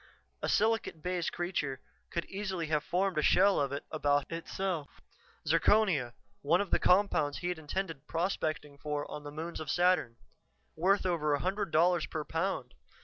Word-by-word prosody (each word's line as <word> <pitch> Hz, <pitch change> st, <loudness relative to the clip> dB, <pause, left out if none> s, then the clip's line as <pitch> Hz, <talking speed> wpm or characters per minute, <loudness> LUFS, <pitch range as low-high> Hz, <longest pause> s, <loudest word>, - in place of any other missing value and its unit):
A -, -, -1 dB
silicate 220 Hz, -7 st, +1 dB
base 180 Hz, -1 st, -1 dB
creature 155 Hz, -7 st, -2 dB, 0.3 s
could 170 Hz, -, -2 dB
easily 190 Hz, -4 st, -3 dB
have 150 Hz, -1 st, +1 dB
formed 185 Hz, -2 st, 0 dB
a -, -, +2 dB
shell 195 Hz, +5 st, +4 dB
of 140 Hz, -1 st, 0 dB
it 140 Hz, -, -4 dB
about 145 Hz, -2 st, +1 dB
itself. 165 Hz, -2 st, -4 dB, 0.5 s
Zirconia 175 Hz, -, +3 dB, 0.3 s
one 165 Hz, +5 st, +3 dB
of 200 Hz, -, -2 dB
the -, -, +3 dB
compounds 180 Hz, -6 st, +3 dB
he'd 175 Hz, -2 st, -3 dB
intended 160 Hz, -1 st, -4 dB
prospecting 155 Hz, -4 st, -2 dB
for 150 Hz, 0 st, -3 dB
on 150 Hz, -, -6 dB
the 145 Hz, -, -7 dB
moons 160 Hz, +3 st, -5 dB
of 155 Hz, -3 st, -6 dB
Saturn. 175 Hz, -8 st, +2 dB, 0.6 s
Worth 190 Hz, +5 st, +2 dB
over 155 Hz, -5 st, +1 dB
a -, -, -3 dB
hundred 195 Hz, +4 st, -1 dB
dollars 170 Hz, +1 st, +3 dB
per 155 Hz, -, -4 dB
pound. 160 Hz, -7 st, -2 dB
165 Hz, 160 wpm, -31 LUFS, 150-185 Hz, 0.6 s, shell